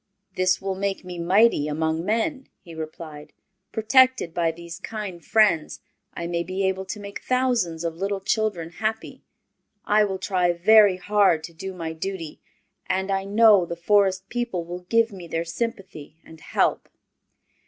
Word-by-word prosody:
"This 185 0 +2
will 195 0 -3
make 195 0 -3
me 180 -1 -7
mighty 185 -2 +3
among 160 +2 -1
men," 260 - -1
he 170 - -13
replied. 155 -1 -8 0.4
"Protected 255 -4 +3
by 170 -1 +1
these 170 0 -10
kind 205 -6 -6
friends 210 -8 +2 0.4
I 170 - -4
may 170 0 -1
be 185 +3 -3
able 190 0 -2
to 200 +2 -6
make 200 0 -8
thousands 245 -11 0
of 165 -1 -3
little 195 +2 -2
children 195 -4 -1
happy. 220 +4 -4 0.6
I 210 +1 +4
will 190 -2 -3
try 185 -2 +1
very 205 +2 +5
hard 190 -4 +2
to 170 - -8
do 190 +4 -6
my 165 -3 -5
duty, 165 -1 -6 0.5
and 190 +1 -1
I 195 0 -1
know 210 -1 +5
the 170 0 -5
Forest 190 +1 +2
people 235 -8 -3
will 180 +1 -8
give 230 -1 +3
me 185 -3 -9
their 165 +1 -2
sympathy 190 - -5
and 160 -1 -14
help." - - 0
190 Hz, 160 wpm, -24 LUFS, 170-210 Hz, 0.6 s, very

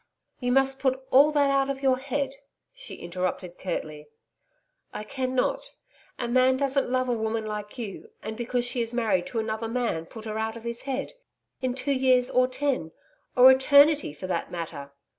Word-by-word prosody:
'You 245 -1 -1
must 270 +1 +3
put 260 -1 +1
all 285 +4 +7
that 285 -2 +3
out 275 0 +2
of 275 0 -4
your 260 -1 +3
head,' 275 0 -3 0.4
she - - -8
interrupted 180 0 -4
curtly. 155 -5 -5 0.9
'I 210 - -4
cannot. 255 +3 -2 0.4
A 240 - -2
man 255 +2 +3
doesn't 275 -1 0
love 255 0 +1
a 245 - +1
woman 220 0 -2
like 210 +1 -6
you, 215 -6 -7
and, 220 +1 -4
because 240 +1 -1
she 245 0 0
is 230 +1 -3
married 205 -7 +1
to 235 - -6
another 220 0 -2
man, 230 -9 -2
put 220 +2 -10
her 215 0 -3
out 220 +1 -2
of 230 - -11
his 235 0 -3
head 270 +1 -3 0.5
in 255 -1 -1
two 270 +2 0
years 255 -2 +3
or 255 0 +4
ten 255 - -2 0.4
or 255 +1 +9
Eternity, 285 - +5
for 150 +5 -8
that 180 -2 -2
matter.' 155 -5 -6
245 Hz, 180 wpm, -26 LUFS, 220-265 Hz, 0.9 s, or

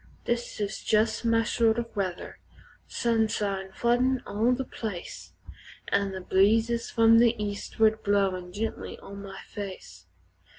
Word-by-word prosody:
This 240 -1 -2
is 205 0 -3
jes' 220 +2 +2
my 230 -1 +3
style 225 0 +2
o' 235 - -2
weather 185 -3 -4 0.5
sunshine 210 -4 0
floodin' 245 +4 +1
all 215 +4 +1
the 255 +1 0
place, 210 -9 -7 0.6
An' 200 -1 +1
the 190 0 -6
breezes 225 +6 +2
from 230 0 +5
the 235 0 +4
eastward 215 +1 0
blowin' 190 -3 0
gently 220 +4 -4
on 200 0 -10
my 195 -1 -9
face. 185 - -8
215 Hz, 130 wpm, -27 LUFS, 195-230 Hz, 0.6 s, from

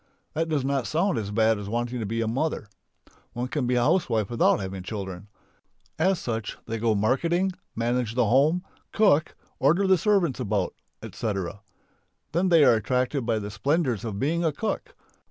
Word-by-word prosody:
That 165 +1 -1
does 145 -4 0
not 135 -3 0
sound 170 - +1
as 100 -2 -4
bad 110 0 +2
as 100 0 -6
wanting 120 +2 -2
to 110 - -3
be 115 +2 -1
"mother." 135 +4 -1 0.7
One 120 +1 -3
can 135 -4 -1
be 125 - +1
a 120 - +3
housewife 120 - +1
without 120 - +3
having 95 -1 -5
children. 95 -1 -6 0.7
As 190 -1 +3
such 115 -7 -4
they 115 0 -4
go 115 -1 +2
marketing, 170 - +1 0.2
manage 115 0 -1
the 125 -2 +3
home, 145 - +3 0.3
cook, 190 -8 +3 0.2
order 170 +9 +3
the 190 -2 +4
servants 190 - +2
about, 100 -2 -1 0.3
etc. 100 -2 -4 0.7
Then 180 +3 +1
they 165 -3 +6
are 125 -3 +7
attracted 125 +3 0
by 115 -2 +2
the 105 -1 -5
splendours 135 - 0
of 110 -4 -4
being 165 +9 0
a 160 - +2
cook. 220 - -4
125 Hz, 175 wpm, -26 LUFS, 110-160 Hz, 0.7 s, are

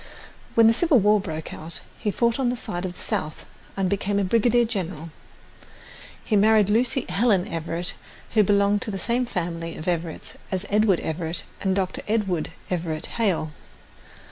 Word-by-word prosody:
When 230 - +7
the 225 - +7
Civil 315 +3 +4
War 210 0 +4
broke 160 -5 -5
out, 160 +1 -7 0.2
he 210 - -1
fought 235 +4 +1
on 255 -2 +2
the 245 - -2
side 175 -4 -4
of 180 -1 -5
the - - -14
South 155 -8 -3 0.3
and 195 -1 +1
became 200 +1 0
a 200 - +2
brigadier 235 +4 +3
general. 180 -7 -4 1.1
He 215 - +1
married 210 0 +5
Lucy 245 +3 +1
Helen 200 -4 +2
Everett, 170 0 -3 0.4
who 220 - +5
belonged 200 0 +3
to - - -3
the 195 - -3
same 240 +6 0
family 165 -4 -3
of 155 - -8
Everetts 170 -2 -3
as 190 +1 -2
Edward 210 -3 +3
Everett 160 +1 -3 0.2
and 190 -1 +1
Dr. 185 -1 -1
Edward 200 -7 0 0.2
Everett 165 -3 -2
Hale. 180 -8 +1
195 Hz, 170 wpm, -24 LUFS, 170-220 Hz, 1.1 s, When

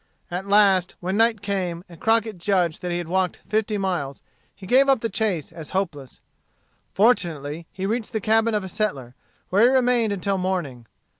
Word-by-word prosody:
At 180 +3 -4
last, 200 -3 +4
when 185 +2 -2
night 225 -1 +2
came, 185 -4 -2
and 170 -2 -15
Crockett 225 -3 +1
judged 175 -4 0
that 180 - -3
he 175 - -1
had 175 -2 -4
walked 185 +1 -1
fifty 215 0 0
miles, 175 -9 -3 0.3
he 195 - -12
gave 265 +7 +4
up 270 -4 +3
the 230 - -1
chase 195 -7 -2
as 160 -3 -10
hopeless. 145 -9 -4 0.7
Fortunately 165 - +1
he 190 - -5
reached 220 +2 -2
the 220 - -1
cabin 225 +1 +2
of 210 - 0
a - - -5
settler, 155 - -3 0.4
where 195 +3 +3
he 235 - +7
remained 250 -4 +2
until 195 0 -1
morning. 165 -11 -3
195 Hz, 180 wpm, -23 LUFS, 175-220 Hz, 0.7 s, he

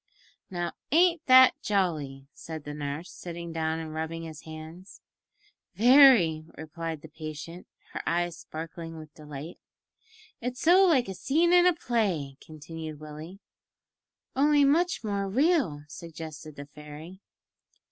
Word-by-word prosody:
"Now, 175 -2 -3 0.2
ain't 340 +1 +4
that 260 0 +7
jolly?" 150 -9 -1
said 160 -2 -8
the 145 - -7
nurse, 145 +3 -5
sitting 170 -1 -7
down 160 0 -1
and 160 -1 -6
rubbing 160 +1 -4
his 160 -2 -9
hands. 160 +4 -10 0.8
"Very!" 235 - +6
replied 160 0 -6
the - - -9
patient, 155 +2 -8 0.3
her - - -4
eyes 175 0 0
sparkling 165 +1 -8
with 155 -1 -11
delight. 150 +2 -9 0.8
"It's 250 +1 -4
so 365 +4 +6
like 270 -8 +3
a 190 - -4
scene 325 - +2
in 355 0 +6
a 360 - +5
play," 195 - -1
continued 155 0 -9
Willie. 155 +6 -10 0.9
"Only 290 +1 +4
much 340 +2 +2
more 200 -2 -2
real," 260 - +1
suggested 155 -1 -9
the 145 - -8
fairy. 150 +5 -11
165 Hz, 130 wpm, -28 LUFS, 155-235 Hz, 0.9 s, that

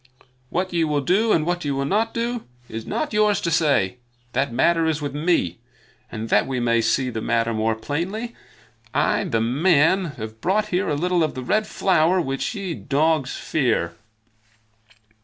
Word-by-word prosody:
What 185 +1 -2
ye 170 -1 +2
will 150 -2 0
do, 200 +9 +2
and 155 -5 +3
what 175 +1 -1
ye 145 - -2
will 135 0 -1
not 220 +9 +1
do, 235 0 -3 0.2
is 110 0 -7
not 305 -7 -2
yours 210 -2 +3
to 170 - -1
say. 140 - +2 0.4
That - - 0
matter 165 +7 +2
is 160 -1 0
with 145 -2 -4
me; 145 - 0 0.5
and 110 0 -5
that 105 - +3
we 130 -2 -2
may 115 -1 +2
see 125 +3 +1
the 110 -1 -4
matter 115 0 0
more 110 0 0
plainly, 180 - -4 0.6
I, - - +2
the 115 - 0
man, 160 +8 +3
have 110 0 -7
brought 210 +4 +1
here 180 +1 0
a 150 - +1
little 175 +2 +1
of 155 - -2
the 130 - -5
Red 215 +11 +1
Flower 180 -2 +2
which 135 - -2
ye, 195 -4 -3
dogs, 150 -2 0
fear." 115 - 0
155 Hz, 175 wpm, -23 LUFS, 125-185 Hz, 0.6 s, and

